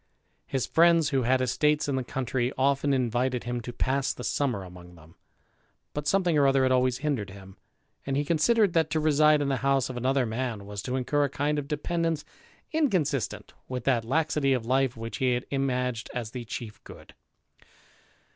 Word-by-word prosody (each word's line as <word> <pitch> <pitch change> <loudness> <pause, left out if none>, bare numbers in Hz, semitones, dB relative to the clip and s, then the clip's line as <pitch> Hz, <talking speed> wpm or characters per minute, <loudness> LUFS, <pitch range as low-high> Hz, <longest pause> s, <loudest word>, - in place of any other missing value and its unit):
His 135 -2 -1
friends 165 -2 +4
who 135 -3 +1
had 130 +2 +2
estates 150 +4 +1
in 140 - 0
the 130 - -1
country, 125 0 -2
often 140 +1 +2
invited 125 -1 0
him 120 0 -3
to 120 - -6
pass 130 +2 0
the 125 - -8
summer 125 -10 -1
among 90 -1 -12
them, 80 0 -17 0.8
but 150 0 -4
something 180 -2 +2
or 140 - +5
other 135 -1 +3
had 130 - +2
always 130 -1 +2
hindered 125 -10 -1
him; 95 -1 -12 0.5
and 135 0 -2
he 145 - 0
considered, 195 +6 +3
that 160 -2 +2
to 160 - 0
reside 150 -1 +4
in - - -1
the 135 - +1
house 135 0 +1
of 125 - -7
another 130 +1 +1
man 115 -2 -3
was 100 0 -6
to 125 +4 -3
incur 145 +3 +1
a - - -2
kind 145 +2 -1
of 140 - -6
dependence 165 +1 -1 0.5
inconsistent 185 - 0
with 125 -2 -4
that 120 -4 +2
laxity 150 +2 +1
of 125 -3 -1
life 130 0 +1
which 115 0 -5
he 130 -1 +2
had 120 +1 -2
imaged 125 -4 -1
as 115 -3 -4
the 125 -2 -6
chief 110 -1 -7
good. - - -13
130 Hz, 190 wpm, -27 LUFS, 120-145 Hz, 0.8 s, or